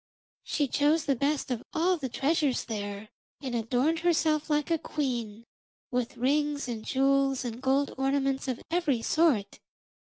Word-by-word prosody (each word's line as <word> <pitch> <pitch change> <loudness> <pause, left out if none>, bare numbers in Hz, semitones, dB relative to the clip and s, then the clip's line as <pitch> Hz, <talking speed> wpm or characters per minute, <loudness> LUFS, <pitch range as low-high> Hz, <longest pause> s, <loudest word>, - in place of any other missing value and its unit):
She 290 -2 0
chose 295 +4 +2
the 275 - +2
best 280 +1 -1
of 240 -2 -1
all 355 +3 +2
the 275 -6 -4
treasures 280 +1 +1
there 205 -1 -5 0.3
and 265 -4 -5
adorned 250 +8 +1
herself 315 -3 +1
like 300 +1 +1
a 330 - +2
queen, 235 -8 -3 0.5
with 250 -2 -2
rings 290 +3 +1
and 225 -3 -4
jewels 270 0 +2
and 240 0 -5
gold 270 +2 +1
ornaments 270 0 0
of 255 -2 -3
every 305 -9 +1
sort. 300 -11 +2
275 Hz, 150 wpm, -28 LUFS, 245-300 Hz, 0.5 s, chose